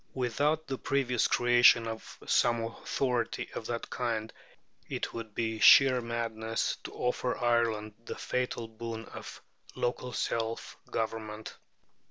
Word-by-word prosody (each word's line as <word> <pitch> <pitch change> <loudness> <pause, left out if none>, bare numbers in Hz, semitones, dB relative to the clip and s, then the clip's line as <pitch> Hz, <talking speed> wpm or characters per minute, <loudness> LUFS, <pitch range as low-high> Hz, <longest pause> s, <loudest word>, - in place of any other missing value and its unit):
Without 145 +5 +1
the 135 -3 -4
previous 125 -4 +1
creation 120 -1 +5
of 110 0 -7
some 120 -1 +3
authority 120 +1 -2
of 110 - -5
that 120 -1 -3
kind 115 -3 -2 0.6
it - - -3
would 115 -2 -7
be 110 -1 -1
sheer 130 0 +8
madness 115 -1 -2
to - - -7
offer 125 0 -1
Ireland 115 -3 +1
the - - -5
fatal 125 -2 -2
boon 115 0 -6
of - - -10 0.3
local 125 +1 -2
self 115 -1 -2
government. 110 -1 -4
115 Hz, 125 wpm, -30 LUFS, 110-125 Hz, 0.6 s, sheer